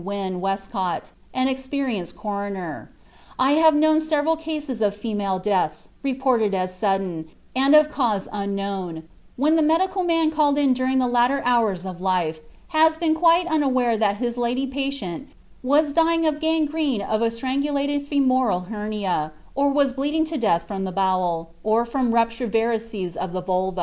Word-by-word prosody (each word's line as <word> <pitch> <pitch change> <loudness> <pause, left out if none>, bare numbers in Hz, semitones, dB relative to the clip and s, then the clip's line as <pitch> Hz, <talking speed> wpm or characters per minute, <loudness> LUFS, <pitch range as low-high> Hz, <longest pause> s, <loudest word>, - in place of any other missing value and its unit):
Wynn 190 -2 -4
Westcott, 195 -1 -3 0.2
an 255 0 +1
experienced 260 - -3
coroner. 200 -5 -5 0.5
"I 265 +2 +3
have 315 +1 +5
known 310 +1 +4
several 315 0 +1
cases 305 -6 -5
of 205 -1 +1
female 205 -3 -2
deaths, 185 -6 -1
reported 255 -6 +1
as 185 -1 -2
sudden, 185 -5 -2 0.3
and 275 +3 +4
of 305 0 +6
cause 220 -9 0
unknown, 195 -4 -4 0.3
when 305 +5 +3
the - - +3
medical 370 +5 +2
man 330 -3 +2
called 295 -2 +2
in 280 -3 +3
during 255 +1 0
the 255 - +3
latter 245 +3 +2
hours 220 -7 +1
of 180 -1 -7
life 180 -4 0 0.3
has 315 -1 +3
been 320 -1 +1
quite 335 +2 +4
unaware 260 -8 +1
that 210 -2 +1
his 240 0 -3
lady 245 +3 0
patient 270 - -4 0.3
was 290 +3 +2
dying 330 +1 +3
of 300 -1 0
gangrene 310 -7 0
of 215 +2 -1
a 230 - +3
strangulated 280 +4 -1
femoral 255 -9 +2
hernia, 210 -7 -2 0.2
or 280 +1 +2
was 280 -1 +2
bleeding 295 +4 0
to 320 0 -5
death 190 - +1
from 195 0 -4
the 190 - -3
bowel, 180 -3 0
or 220 +2 +2
from 245 0 0
ruptured 230 0 0
varices 225 -5 -1
of 185 -1 -4
the 185 - -2
vulva." 185 0 -1
245 Hz, 160 wpm, -23 LUFS, 195-290 Hz, 0.5 s, of